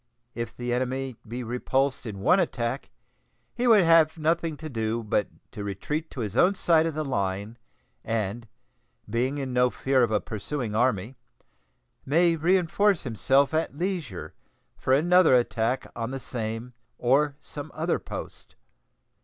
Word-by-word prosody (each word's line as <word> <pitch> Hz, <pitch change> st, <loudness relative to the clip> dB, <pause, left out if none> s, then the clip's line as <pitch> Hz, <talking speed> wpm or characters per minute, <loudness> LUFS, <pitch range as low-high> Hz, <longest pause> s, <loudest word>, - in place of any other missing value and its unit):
If 115 Hz, -1 st, -5 dB
the 120 Hz, 0 st, -2 dB
enemy 130 Hz, +1 st, -2 dB
be 120 Hz, +3 st, -5 dB
repulsed 130 Hz, +3 st, -1 dB
in 100 Hz, -3 st, -6 dB
one 180 Hz, -, +4 dB
attack, 130 Hz, -6 st, -2 dB, 0.6 s
he 245 Hz, +1 st, 0 dB
would 215 Hz, -5 st, +7 dB
have 165 Hz, -1 st, +5 dB
nothing 165 Hz, 0 st, 0 dB
to 160 Hz, -, -7 dB
do 115 Hz, -3 st, -2 dB
but 105 Hz, -1 st, 0 dB, 0.2 s
to 105 Hz, -, -6 dB
retreat 150 Hz, -, -3 dB
to 130 Hz, -, -6 dB
his 105 Hz, -1 st, -4 dB
own 180 Hz, +9 st, +4 dB
side 165 Hz, -3 st, +3 dB
of 160 Hz, -, -4 dB
the 155 Hz, 0 st, -2 dB
line, 100 Hz, -2 st, -2 dB, 0.4 s
and, 115 Hz, +1 st, -2 dB, 0.6 s
being 125 Hz, +6 st, -1 dB
in 135 Hz, -3 st, -3 dB
no 125 Hz, 0 st, +4 dB
fear 135 Hz, +1 st, +1 dB
of 120 Hz, -, +3 dB
a 105 Hz, -1 st, +2 dB
pursuing 110 Hz, +4 st, -4 dB
army, 120 Hz, 0 st, 0 dB, 0.9 s
may 165 Hz, +4 st, +3 dB
reenforce 180 Hz, +3 st, +2 dB
himself 135 Hz, +4 st, +2 dB
at 155 Hz, -3 st, -1 dB
leisure 170 Hz, -, -3 dB, 0.4 s
for -, -, -2 dB
another 170 Hz, +2 st, +5 dB
attack 120 Hz, 0 st, +1 dB
on 115 Hz, 0 st, -3 dB
the 135 Hz, +1 st, -4 dB
same 115 Hz, 0 st, -5 dB, 0.2 s
or 140 Hz, +4 st, +2 dB
some 145 Hz, +1 st, -8 dB
other 165 Hz, +2 st, 0 dB
post. -, -, -8 dB
130 Hz, 150 wpm, -26 LUFS, 115-155 Hz, 0.9 s, would